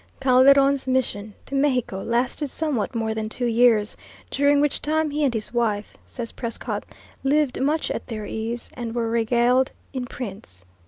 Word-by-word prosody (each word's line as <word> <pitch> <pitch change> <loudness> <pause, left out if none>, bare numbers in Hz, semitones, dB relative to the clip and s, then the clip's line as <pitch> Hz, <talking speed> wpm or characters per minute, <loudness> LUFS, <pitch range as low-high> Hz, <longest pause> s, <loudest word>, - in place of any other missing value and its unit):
Calderon's 275 +1 +5
mission 220 -5 -1
to - - -10
Mexico 255 -8 +1
lasted 245 +6 -1
somewhat 270 -6 -2
more 225 -1 -1
than 220 0 -3
two 245 +2 -2
years, 230 -2 +3 0.4
during 285 +1 +3
which 295 0 +1
time 310 0 0
he 300 +1 -1
and 275 - +3
his 220 +1 -3
wife, 215 -4 -1
says 235 -2 -6
Prescott, 230 -2 -4 0.4
"lived 285 -1 +1
much 300 +3 +1
at - - -4
their 215 -3 -5
ease," 225 +3 -4
and 235 -2 -5
"were 230 -1 -1
regaled 240 +3 +2 0.2
en 255 -2 -3
prince." 195 - -8
245 Hz, 160 wpm, -24 LUFS, 225-275 Hz, 0.4 s, Calderon's